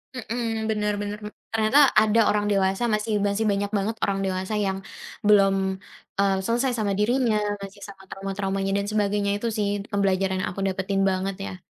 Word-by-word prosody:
Mmm, 225 -2 -2
benar 210 -1 0
benar, 205 0 -4
m 210 - -7 0.2
ternyata 225 +6 +5
ada 215 +1 +3
orang 210 0 0
dewasa 195 +2 +1
masih 215 0 0
masih 200 +2 0
banyak 200 0 0
banget 205 +3 -1
orang 195 -1 +1
dewasa 190 +2 -2
yang 195 -2 0 0.5
belum, 195 -2 +5 0.6
eee, 195 -1 +3
selesai 240 +4 +1
sama 205 -2 0
dirinya, 230 +2 +2 0.3
masih 200 +1 -9
sama 195 -1 -11
trauma-traumanya 195 0 -3
dan 200 - -1
sebagainya 205 -1 +1
itu 205 +3 -3
sih 210 -1 +1 0.2
pembelajaran 195 -2 +1
yang 185 - -1
aku 195 - -6
dapetin 195 0 -1
banget 190 +1 -1
ya. 185 - -7
200 Hz, 170 wpm, -25 LUFS, 195-215 Hz, 0.6 s, ternyata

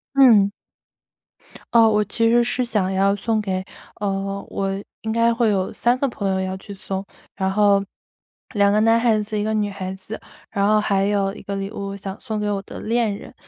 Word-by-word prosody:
嗯。 225 -7 +6 1.2
哦， 230 -1 +7
我 210 -1 +3
其 225 +3 +1
实 240 +1 +4
是 250 +1 0
想 210 -5 0
要 195 +1 +2
送 220 +2 0
给， 190 -2 -2 0.4
呃， 195 0 -2
我 195 0 -2 0.3
应 220 - -2
该 230 +1 +3
会 230 -1 +2
有 190 -2 0
3 240 +1 +1
个 275 - +1
朋 200 -4 -3
友 190 - +1
要 190 0 -3
去 200 +2 -10
送， 190 0 -5 0.3
然 190 -1 -1
后 200 0 +4 0.7
2 200 -2 +4
个 210 - +3
男 225 +1 +4
孩 225 -2 +3
子， 210 0 -3
1 - - 0
个 220 +1 -1
女 210 -1 0
孩 190 -1 -5
子， 190 +3 -7 0.3
然 200 -2 +1
后 215 0 +4
还 195 -2 +1
有 200 -1 +1
1 - - -10
个 200 - -5
礼 195 0 -4
物 200 -2 -5
想 195 0 -7
送 220 -4 -4
给 210 - -1
我 200 -1 -1
的 - - -9
恋 225 -2 0
人。 - - -12
205 Hz, 205 characters per minute, -22 LUFS, 195-225 Hz, 1.2 s, 哦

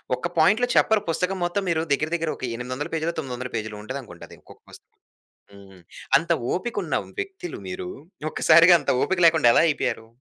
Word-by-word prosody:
ఒక్క 125 +7 -4
పాయింట్‌లో 205 +10 +4
చెప్పరు 220 -1 +3
పుస్తకం 180 +3 -1
మొత్తం 185 +3 -2
మీరు 165 -2 +1
దెగ్గెర 150 +2 +1
దెగ్గెర 165 -2 -1
ఒక - - -13
800 130 +4 -5
పేజీలో, 165 +1 -1
900 125 -6 -5
ఉంటదనుకుంట. 120 -6 -8
అది - - -15
ఒకొక్క - - -18
పుస్తకం. - - -18 0.5
హ్మ్. 100 -2 -16 0.4
అంత - - -3 0.2
ఓపిక 235 +6 -4
ఉన్న - - -1 0.2
వ్యక్తులు 385 -3 -6
మీరు, 185 -1 -6 0.4
ఒక్కసారిగా 170 +2 +6
అంత 145 - -1
ఓపిక 190 -1 -1
లేకుండా 160 -7 +4
ఎలా - - +5
అయిపోయారు? 140 -7 -2
160 Hz, 165 wpm, -24 LUFS, 125-180 Hz, 0.5 s, ఒక్కసారిగా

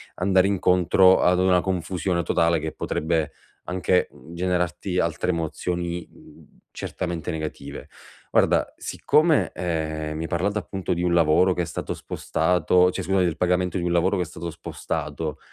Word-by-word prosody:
andare 95 +1 +3
incontro 95 -1 +4
ad 90 0 +3
una 90 -1 +4
confusione 90 -1 -1
totale, 85 +1 +2
che 80 +1 -4
potrebbe 80 0 -2 0.3
anche, 90 0 +1
mhmm, 75 +3 -14
generarti 90 +1 -1
altre 85 +1 0
emozioni, 85 +1 -3
uhm, - - -18 0.2
certamente 85 -2 -4
negative. 75 -3 -6 0.4
Guarda, - - +2
siccome, 155 +1 +2
ehm, 80 -3 -3
mi 80 - -4
hai - - -3
parlato 100 +5 0
appunto 95 -2 -3
di 85 - -2
un 90 -1 +1
lavoro 85 +2 +4
che 90 - -1
è - - -3
stato 80 - -4
spostato, 90 +2 +1
cioè, - - -4
scusa, 95 0 +1
del 85 -4 +1
pagamento 90 0 +1
di 90 - -2
un 85 - 0
lavoro 90 +3 +2
che 90 - +1
è - - -6
stato 85 +1 -7
spostato 75 -1 -5
90 Hz, 160 wpm, -24 LUFS, 80-90 Hz, 0.4 s, incontro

